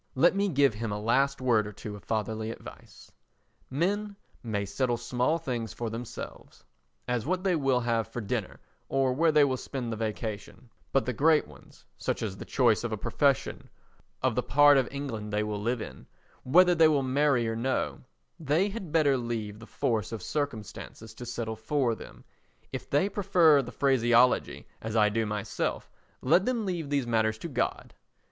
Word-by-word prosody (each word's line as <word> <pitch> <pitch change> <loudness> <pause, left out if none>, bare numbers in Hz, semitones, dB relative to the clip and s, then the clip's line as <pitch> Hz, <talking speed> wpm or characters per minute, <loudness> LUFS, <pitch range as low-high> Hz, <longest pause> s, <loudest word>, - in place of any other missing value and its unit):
Let 170 +8 +4
me 200 0 +1
give 140 - +3
him 110 0 -4
a 105 - -2
last 135 +5 +1
word 115 -5 +2
or - - -6
two 105 +1 -8
of 100 - -12
fatherly 110 0 -2
advice. 115 - -11 0.6
Men 200 +8 -1 0.3
may 105 -3 -2
settle 120 +5 -1
small 125 +6 0
things 125 -8 -4
for 115 -2 -4
themselves—as 115 - -7
what 185 +1 0
they 190 -3 +2
will 135 -5 +2
have 115 -2 0
for 115 +2 -6
dinner 105 - -3 0.3
or 135 -1 +2
where 160 +4 +3
they 150 -1 +5
will 130 -2 +1
spend 125 -2 -5
the - - -2
vacation—but 110 +4 -4
the 125 - -1
great 155 +5 +3
ones—such - - -7
as 100 -4 -3
the - - -8
choice 120 -5 +2
of 120 - -2
a 110 - -2
profession, 140 +6 0 0.5
of - - +2
the - - +1
part 145 -1 +6
of 130 - 0
England 115 -7 -5
they 105 +1 +1
will 105 -1 -3
live 115 +1 -1
in, - - -11 0.3
whether 180 +6 +5
they 165 -2 +6
will 145 -3 +2
marry 130 -2 +2
or 115 - -2
no—they 135 - -2
had 195 -6 -7
better 150 -4 +3
leave 110 -4 -4
the 115 - -12
force 110 -4 -1
of 115 - -5
circumstances 115 -5 -5
to 120 - -9
settle 115 -2 -3
for 120 +2 0
them; - - -11 0.5
if - - -6
they 145 +7 +2
prefer 180 -7 +4
the 125 - -8
phraseology, 125 -2 +3 0.2
as 110 0 -4
I 105 -2 +5
do 110 +1 -1
myself, 105 -1 -3 0.3
let 170 +9 +4
them 240 -4 0
leave 170 -6 -3
these 140 -3 0
matters 110 -2 +1
to 140 - -6
God. 130 -6 -2
125 Hz, 175 wpm, -28 LUFS, 110-145 Hz, 0.6 s, part